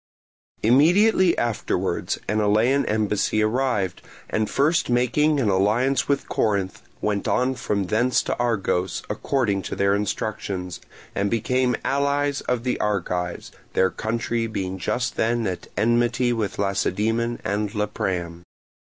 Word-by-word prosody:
Immediately 175 Hz, -, +4 dB
afterwards 120 Hz, -3 st, -1 dB
an 110 Hz, -, +1 dB
Elean 110 Hz, +7 st, +2 dB
embassy 110 Hz, 0 st, +1 dB
arrived, 110 Hz, -5 st, 0 dB, 0.3 s
and 110 Hz, -1 st, 0 dB
first 155 Hz, +4 st, +2 dB
making 145 Hz, +5 st, +2 dB
an 125 Hz, -, +1 dB
alliance 110 Hz, +7 st, +2 dB
with 140 Hz, -1 st, 0 dB
Corinth 100 Hz, -4 st, -1 dB, 0.2 s
went 105 Hz, -1 st, -1 dB
on 125 Hz, +1 st, +2 dB
from 105 Hz, -5 st, -1 dB
thence 115 Hz, +7 st, +1 dB
to -, -, -2 dB
Argos, 95 Hz, -6 st, 0 dB
according 110 Hz, -8 st, 0 dB
to -, -, -5 dB
their 100 Hz, 0 st, +2 dB
instructions, 100 Hz, -3 st, -3 dB, 0.3 s
and 100 Hz, +1 st, 0 dB
became 125 Hz, +3 st, +1 dB
allies 140 Hz, 0 st, +1 dB
of 125 Hz, -2 st, 0 dB
the 125 Hz, -, -1 dB
Argives, 90 Hz, -4 st, -2 dB, 0.2 s
their 95 Hz, 0 st, +3 dB
country 115 Hz, +1 st, -2 dB
being 95 Hz, -3 st, -4 dB
just 120 Hz, +7 st, -2 dB
then 115 Hz, 0 st, +1 dB
at 90 Hz, -3 st, -4 dB
enmity 120 Hz, +3 st, +2 dB
with 110 Hz, -4 st, -2 dB
Lacedaemon 110 Hz, +4 st, 0 dB
and 105 Hz, +2 st, -2 dB
Lepreum. 90 Hz, -5 st, -2 dB
110 Hz, 125 wpm, -23 LUFS, 100-125 Hz, 0.3 s, Immediately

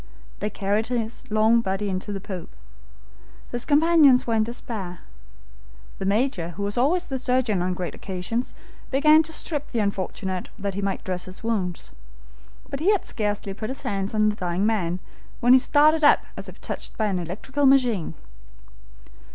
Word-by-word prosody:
They 210 Hz, -, -1 dB
carried 205 Hz, +2 st, -1 dB
his 235 Hz, -2 st, -3 dB
long 220 Hz, +2 st, +4 dB
body 195 Hz, 0 st, -2 dB
onto 190 Hz, +2 st, -3 dB
the 200 Hz, -, -3 dB
poop. 185 Hz, -3 st, -7 dB, 1.0 s
His 240 Hz, 0 st, -2 dB
companions 300 Hz, -3 st, +5 dB
were 230 Hz, -, -1 dB
in 220 Hz, -1 st, +3 dB
despair. 215 Hz, -6 st, -5 dB, 1.0 s
The 195 Hz, -, -2 dB
Major, 205 Hz, -5 st, +1 dB
who 200 Hz, -, -3 dB
was 205 Hz, 0 st, -1 dB
always 330 Hz, +9 st, +2 dB
the 265 Hz, -1 st, -4 dB
surgeon 250 Hz, -7 st, +1 dB
on 180 Hz, 0 st, -1 dB
great 180 Hz, -1 st, -4 dB
occasions, 195 Hz, +6 st, -3 dB, 0.4 s
began 305 Hz, +3 st, +6 dB
to 320 Hz, 0 st, -5 dB
strip 300 Hz, -2 st, -3 dB
the 240 Hz, -, -4 dB
unfortunate 190 Hz, -2 st, -2 dB
that 200 Hz, -1 st, -3 dB
he 200 Hz, -, -3 dB
might 195 Hz, -1 st, -2 dB
dress 180 Hz, -1 st, -3 dB
his 185 Hz, +3 st, -10 dB
wounds; 195 Hz, -7 st, -2 dB, 0.8 s
but 275 Hz, -, -5 dB
he 340 Hz, +6 st, +2 dB
had 410 Hz, -, +1 dB
scarcely 205 Hz, -2 st, -2 dB
put 215 Hz, +3 st, -5 dB
his 265 Hz, -, -6 dB
hands 195 Hz, +1 st, -2 dB
on 215 Hz, 0 st, +4 dB
the 210 Hz, -, -2 dB
dying 180 Hz, 0 st, -1 dB
man 185 Hz, -5 st, 0 dB, 0.4 s
when 245 Hz, +1 st, +5 dB
he 260 Hz, -, +8 dB
started 305 Hz, +4 st, +4 dB
up 290 Hz, -, +6 dB
as -, -, -7 dB
if -, -, -14 dB
touched -, -, -6 dB
by 220 Hz, -, +1 dB
an 195 Hz, -3 st, 0 dB
electrical 250 Hz, -, -1 dB
machine. 245 Hz, -, +3 dB
215 Hz, 175 wpm, -24 LUFS, 195-260 Hz, 1.0 s, he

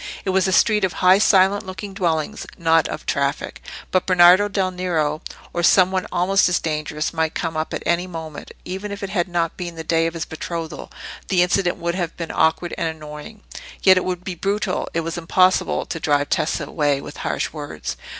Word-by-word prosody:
It 190 Hz, -, +1 dB
was 190 Hz, 0 st, +2 dB
a -, -, +1 dB
street 210 Hz, +2 st, +3 dB
of 190 Hz, -, +1 dB
high 185 Hz, +2 st, +5 dB
silent 200 Hz, -1 st, +4 dB
looking 190 Hz, +1 st, -7 dB
dwellings, 175 Hz, 0 st, -2 dB
not 165 Hz, -2 st, +3 dB
of -, -, -6 dB
traffic; 140 Hz, +1 st, -2 dB, 0.3 s
but 185 Hz, -, +1 dB
Bernardo 185 Hz, +2 st, +6 dB
del 195 Hz, -2 st, -1 dB
Nero, 165 Hz, -4 st, -1 dB, 0.3 s
or 175 Hz, -, -1 dB
some 185 Hz, +2 st, +5 dB
one 185 Hz, -1 st, -1 dB
almost 185 Hz, +2 st, +3 dB
as 180 Hz, -, +2 dB
dangerous, 155 Hz, -1 st, -3 dB
might 160 Hz, -1 st, -1 dB
come 165 Hz, -2 st, -2 dB
up 155 Hz, 0 st, -2 dB
at -, -, -4 dB
any 175 Hz, +1 st, +1 dB
moment. 160 Hz, -4 st, -8 dB
Even 190 Hz, +3 st, -5 dB
if 200 Hz, +1 st, -6 dB
it 195 Hz, -, -4 dB
had 180 Hz, -3 st, 0 dB
not 170 Hz, -2 st, -1 dB
been 175 Hz, -2 st, -5 dB
the 160 Hz, -, -6 dB
day 165 Hz, +1 st, +1 dB
of 165 Hz, -, -5 dB
his 160 Hz, -2 st, -3 dB
betrothal, 160 Hz, 0 st, -6 dB, 0.4 s
the 180 Hz, -2 st, +3 dB
incident 180 Hz, 0 st, +1 dB
would 170 Hz, 0 st, -2 dB
have 175 Hz, -3 st, -3 dB
been 165 Hz, -1 st, -4 dB
awkward 160 Hz, +2 st, +1 dB
and 165 Hz, -, 0 dB
annoying. 155 Hz, +6 st, -8 dB, 0.4 s
Yet 190 Hz, -1 st, +7 dB
it 185 Hz, -, +1 dB
would 180 Hz, -1 st, -3 dB
be 185 Hz, -, -4 dB
brutal—it 195 Hz, -2 st, -2 dB
was 165 Hz, +1 st, -4 dB
impossible—to 185 Hz, 0 st, +1 dB
drive 145 Hz, -2 st, +1 dB
Tessa 155 Hz, -, 0 dB
away 145 Hz, -3 st, 0 dB
with -, -, -9 dB
harsh -, -, -2 dB
words. 145 Hz, -, -6 dB
175 Hz, 200 wpm, -21 LUFS, 160-185 Hz, 0.4 s, Yet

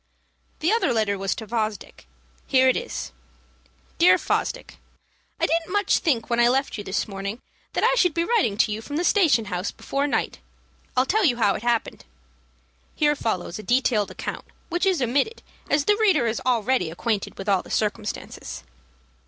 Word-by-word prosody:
_" -, -, -38 dB
The 330 Hz, +5 st, +2 dB
other 450 Hz, -, +2 dB
letter 215 Hz, -3 st, +1 dB
was 195 Hz, 0 st, -2 dB
to 220 Hz, -, -7 dB
Fosdick; 215 Hz, -1 st, -4 dB, 0.4 s
here 260 Hz, -1 st, +4 dB
it 255 Hz, -, +4 dB
is: -, -, -4 dB, 0.9 s
"DEAR 185 Hz, +2 st, +7 dB
FOSDICK, -, -, -2 dB, 0.6 s
I -, -, +3 dB
didn't 335 Hz, +1 st, -1 dB
much 410 Hz, 0 st, +2 dB
think 255 Hz, -9 st, 0 dB
when 235 Hz, 0 st, 0 dB
I 240 Hz, -, +6 dB
left 270 Hz, +3 st, +1 dB
you 205 Hz, -, -5 dB
this 190 Hz, +1 st, -2 dB
morning 200 Hz, +2 st, -5 dB, 0.3 s
that -, -, -1 dB
I -, -, +4 dB
should 360 Hz, -10 st, +2 dB
be 335 Hz, -, +2 dB
writing 350 Hz, -, +1 dB
to 210 Hz, -, +3 dB
you 215 Hz, +1 st, -3 dB
from 290 Hz, +5 st, -7 dB
the 335 Hz, -, 0 dB
station 335 Hz, -, +3 dB
house 180 Hz, 0 st, -3 dB
before 280 Hz, +1 st, -2 dB
night. -, -, -1 dB, 0.6 s
I'll 255 Hz, -, +4 dB
tell 430 Hz, +9 st, +1 dB
you 255 Hz, -9 st, +3 dB
how 205 Hz, -4 st, +3 dB
it -, -, -5 dB
happened." 235 Hz, -1 st, -1 dB, 0.9 s
[Here 295 Hz, -1 st, +2 dB
follows 200 Hz, -7 st, -3 dB
a -, -, -5 dB
detailed 240 Hz, -3 st, +1 dB
account, -, -, -6 dB, 0.2 s
which 350 Hz, +3 st, 0 dB
is 360 Hz, -8 st, +2 dB
omitted, 280 Hz, -, 0 dB, 0.3 s
as 285 Hz, 0 st, +2 dB
the 415 Hz, -, +4 dB
reader 390 Hz, -, +3 dB
is 225 Hz, 0 st, -1 dB
already 240 Hz, -6 st, +1 dB
acquainted 205 Hz, +5 st, -3 dB
with 195 Hz, -, -7 dB
all 195 Hz, -3 st, +3 dB
the -, -, -15 dB
circumstances. 210 Hz, -, -3 dB
240 Hz, 185 wpm, -24 LUFS, 210-315 Hz, 0.9 s, DEAR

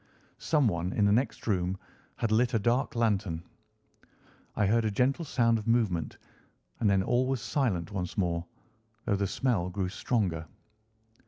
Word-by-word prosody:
Someone 100 Hz, -, +1 dB
in 105 Hz, -, +2 dB
the 100 Hz, -, +4 dB
next 125 Hz, +6 st, 0 dB
room 95 Hz, -3 st, 0 dB, 0.4 s
had 115 Hz, -, -1 dB
lit 120 Hz, +3 st, +2 dB
a -, -, +3 dB
dark 120 Hz, +6 st, +1 dB
lantern. 100 Hz, -8 st, 0 dB, 1.1 s
I 105 Hz, -, +2 dB
heard 115 Hz, +4 st, +3 dB
a 110 Hz, -, +1 dB
gentle 130 Hz, +9 st, +1 dB
sound 115 Hz, -5 st, +2 dB
of 105 Hz, -, -9 dB
movement, 105 Hz, -10 st, +1 dB, 0.6 s
and 110 Hz, -, +3 dB
then 95 Hz, -1 st, +3 dB
all 125 Hz, +5 st, +1 dB
was 135 Hz, -1 st, 0 dB
silent 105 Hz, -, -1 dB
once 90 Hz, -3 st, -4 dB
more, 85 Hz, -3 st, 0 dB, 0.6 s
though 105 Hz, -, +2 dB
the 100 Hz, 0 st, 0 dB
smell 100 Hz, -6 st, 0 dB
grew 95 Hz, 0 st, -2 dB
stronger. 95 Hz, -7 st, -1 dB
105 Hz, 155 wpm, -29 LUFS, 90-120 Hz, 1.1 s, the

